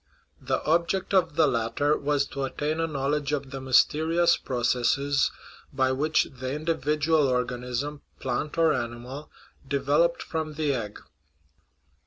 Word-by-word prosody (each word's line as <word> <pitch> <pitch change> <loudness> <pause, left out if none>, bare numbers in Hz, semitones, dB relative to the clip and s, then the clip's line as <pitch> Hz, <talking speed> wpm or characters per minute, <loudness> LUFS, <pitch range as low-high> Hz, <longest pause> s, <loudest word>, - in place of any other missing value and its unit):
The - - -1
object 170 +5 0
of 180 -6 +3
the 160 - +5
latter 120 +6 +1
was 145 -1 0
to 140 - -5
attain 150 +4 -2
a 165 - +1
knowledge 145 0 -1
of 140 -2 -3
the 135 -1 -6
mysterious 160 +6 +3
processes 130 +3 +1 0.4
by 130 -1 +1
which 150 +4 +2 0.2
the 130 0 -3
individual 150 0 +1
organ 125 -1 -1
ism, 140 +4 -3 0.2
plant 130 +5 -3
or 165 -2 +4
animal, 125 +3 -5 0.4
developed - - +1
from 155 -2 -4
the 150 -2 0
egg. 105 -5 -4
145 Hz, 135 wpm, -26 LUFS, 130-155 Hz, 0.4 s, the